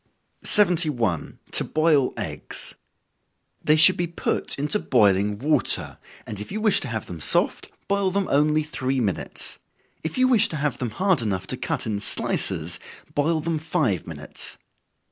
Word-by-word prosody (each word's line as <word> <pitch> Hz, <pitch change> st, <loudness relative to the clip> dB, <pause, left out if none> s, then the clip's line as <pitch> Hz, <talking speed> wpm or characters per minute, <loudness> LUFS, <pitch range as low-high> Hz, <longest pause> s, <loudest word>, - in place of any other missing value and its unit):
71. 155 Hz, -, +2 dB
To -, -, +2 dB
Boil 155 Hz, -4 st, +2 dB
Eggs. -, -, -6 dB, 0.9 s
They 155 Hz, -, +4 dB
should 160 Hz, +4 st, +8 dB
be 175 Hz, -, -1 dB
put 170 Hz, -, -1 dB
into 150 Hz, +9 st, 0 dB
boiling 105 Hz, -, +2 dB
water, 150 Hz, +7 st, +2 dB, 0.3 s
and 105 Hz, -2 st, -7 dB
if 105 Hz, -, -8 dB
you 215 Hz, -, -3 dB
wish 215 Hz, -2 st, +3 dB
to 145 Hz, -, -4 dB
have 110 Hz, -3 st, -4 dB
them 85 Hz, -3 st, -9 dB
soft, -, -, +1 dB, 0.2 s
boil 200 Hz, -1 st, +1 dB
them 195 Hz, +1 st, -1 dB
only 150 Hz, +2 st, +2 dB
three 135 Hz, -3 st, -2 dB
minutes. 100 Hz, -7 st, -2 dB, 0.4 s
If 160 Hz, -, -5 dB
you 255 Hz, 0 st, +4 dB
wish 230 Hz, -4 st, +4 dB
to -, -, -5 dB
have 150 Hz, 0 st, -2 dB
them 125 Hz, -, -2 dB
hard 185 Hz, -, 0 dB
enough 95 Hz, -5 st, -3 dB
to -, -, -4 dB
cut -, -, -3 dB
in 105 Hz, -2 st, -2 dB
slices, 100 Hz, -, +1 dB, 0.3 s
boil 155 Hz, +2 st, 0 dB
them 160 Hz, 0 st, -2 dB
five 150 Hz, -, -1 dB
minutes. -, -, -3 dB
150 Hz, 160 wpm, -23 LUFS, 110-170 Hz, 0.9 s, should